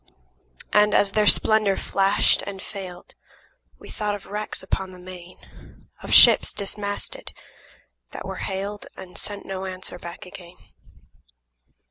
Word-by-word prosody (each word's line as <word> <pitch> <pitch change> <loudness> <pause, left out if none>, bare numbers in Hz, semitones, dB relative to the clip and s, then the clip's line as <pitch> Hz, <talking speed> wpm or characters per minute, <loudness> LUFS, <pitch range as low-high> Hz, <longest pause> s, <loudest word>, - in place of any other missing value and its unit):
And, 210 0 +5
as 200 - +3
their 210 0 +2
splendor 215 -3 +5
flashed 195 +1 +2
and 200 -1 -6
failed, 185 -3 -9 0.6
We - - -13
thought 210 -1 -2
of 200 - -11
wrecks 210 0 -4
upon 190 0 -2
the 185 - -12
main, 180 0 -11 0.6
– - - -28
Of - - -7
ships - - +8
dismasted, 205 - -5 0.8
that - - -8
were - - -5
hailed 200 +2 -5
And 185 -1 -11
sent 205 -1 -5
no 190 0 -5
answer 185 -1 -7
back 170 +1 -9
again. 180 -1 -12
195 Hz, 135 wpm, -24 LUFS, 185-205 Hz, 0.8 s, ships